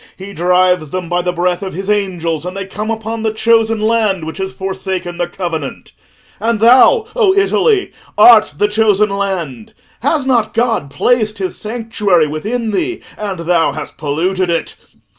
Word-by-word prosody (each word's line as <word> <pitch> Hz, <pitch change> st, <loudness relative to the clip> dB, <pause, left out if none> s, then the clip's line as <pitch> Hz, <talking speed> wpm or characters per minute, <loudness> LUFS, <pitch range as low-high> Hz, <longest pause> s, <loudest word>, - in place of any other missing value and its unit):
He 195 Hz, +1 st, -9 dB
drives 180 Hz, -2 st, +2 dB
them 180 Hz, +1 st, -5 dB
by 175 Hz, 0 st, +1 dB
the 180 Hz, 0 st, -1 dB
breath 180 Hz, +1 st, -1 dB
of 190 Hz, -4 st, -6 dB
his 195 Hz, +2 st, -5 dB
angels, 175 Hz, -6 st, -1 dB
and 180 Hz, +2 st, -6 dB
they 195 Hz, -, -4 dB
come 210 Hz, +3 st, -5 dB
upon 225 Hz, 0 st, -3 dB
the 220 Hz, 0 st, 0 dB
chosen 225 Hz, 0 st, +2 dB
land 215 Hz, -5 st, +1 dB
which 160 Hz, +4 st, -7 dB
has 190 Hz, 0 st, -3 dB
forsaken 190 Hz, -2 st, -5 dB
the 175 Hz, -, 0 dB
covenant. 165 Hz, -6 st, -5 dB, 0.5 s
And 225 Hz, +1 st, 0 dB
thou, 255 Hz, -, +5 dB
O 415 Hz, -6 st, +3 dB
Italy, 400 Hz, 0 st, +2 dB, 0.3 s
art 215 Hz, -10 st, +7 dB
the 205 Hz, -, +2 dB
chosen 210 Hz, -1 st, +2 dB
land; 185 Hz, -, -4 dB, 0.2 s
has 285 Hz, +2 st, 0 dB
not 245 Hz, -4 st, +1 dB
God 230 Hz, -, 0 dB
placed 215 Hz, -, 0 dB
his 190 Hz, -2 st, -3 dB
sanctuary 210 Hz, -6 st, 0 dB
within 215 Hz, +10 st, -3 dB
thee, 355 Hz, -, -2 dB
and 195 Hz, -5 st, -5 dB
thou 165 Hz, -4 st, +1 dB
hast 150 Hz, -1 st, -8 dB
polluted 175 Hz, +5 st, -1 dB
it? 170 Hz, -1 st, -1 dB
195 Hz, 165 wpm, -15 LUFS, 175-225 Hz, 0.5 s, art